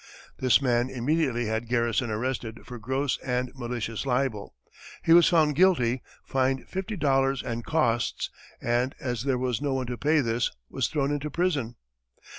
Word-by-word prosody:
This 130 +1 +4
man 120 -1 +2
immediately 130 -1 0
had 110 +2 -2
Garrison 120 0 +1
arrested 115 0 -3
for 125 -1 -8
"gross 130 +4 -1
and 125 -1 -2
malicious 120 -3 -4
libel," 125 -5 -1 0.5
he 165 - +5
was 170 -1 +7
found 155 -4 +4
guilty, 135 -8 +3 0.2
fined 130 0 0
fifty 190 +3 -4
dollars 135 -3 +2
and 115 0 -4
costs, 120 -8 0 0.3
and 120 +2 0
as 120 -4 -3
there 135 -2 +1
was 125 -3 -1
no 140 -2 0
one 130 -1 -1
to 125 0 -5
pay 155 +1 +3
this, 115 -1 0 0.2
was - - 0
thrown 145 -2 0
into 145 +1 -2
prison. 145 -8 -1
130 Hz, 160 wpm, -27 LUFS, 120-140 Hz, 0.5 s, was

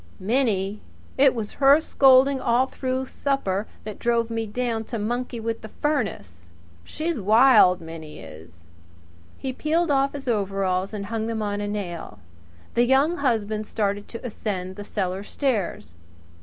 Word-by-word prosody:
"Minnie! 210 -2 0 0.3
It 270 -1 +5
was 215 -3 -4
her 280 +2 +7
scolding 270 -3 +4
all 245 +2 +3
through 260 0 -3
supper 220 -8 -1 0.2
that 215 -1 -7
drove 235 -1 +1
me 225 -1 -2
down 230 0 -2
to 235 - -4
monkey 240 +3 -3
with 225 0 -3
the 220 - -8
furnace. 175 - -3 0.3
She's 315 - -3
wild 215 -3 +6
Minnie 160 -2 -9
is." 80 +2 -13 0.7
He 265 -1 -4
peeled 320 +4 0
off 275 0 +2
his 280 -2 -7
overalls 195 -4 0
and 205 -2 -5
hung 220 +1 -3
them 225 -1 -2
on 205 0 -2
a 205 - -2
nail. 175 - -5 0.6
The 240 - +3
Young 275 +7 +3
Husband 220 -5 0
started 205 -1 -2
to 230 - -8
ascend 190 -5 -4
the 205 - -7
cellar 190 -2 -3
stairs. 205 - -2
220 Hz, 150 wpm, -24 LUFS, 195-260 Hz, 0.7 s, her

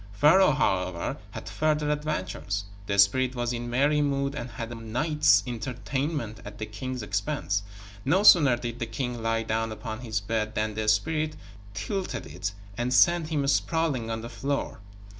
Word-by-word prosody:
Pharaoh, 150 - +5
however, 90 -9 0
had - - -8
further 150 -1 0
adventures. 100 -9 -2 0.2
The 100 - 0
spirit 130 +6 +4
was 120 0 -1
in 120 0 -4
merry 145 +5 +3
mood 140 -1 0
and 120 -4 -5
had 115 0 -6
a - - -5
night's 140 +8 +2
entertainment 125 0 -3
at 105 0 -9
the 110 - -4
king's 125 +3 -5
expense. 100 0 -1 0.4
No 180 +9 +3
sooner 145 -11 +7
did 120 0 -5
the 115 - -2
king 120 +1 -3
lie 115 0 0
down 115 0 -1
upon 110 0 -6
his 110 -3 -2
bed 110 +1 -2
than 110 0 0
the 110 0 -3
spirit 155 +8 +1 0.4
tilted 185 - -3
it 105 - -4 0.3
and 120 +1 0
sent 165 +6 +4
him 150 -3 0
sprawling 140 -4 +1
on 110 0 -3
the 115 - -6
floor. 140 -1 -3
120 Hz, 165 wpm, -27 LUFS, 110-145 Hz, 0.4 s, sooner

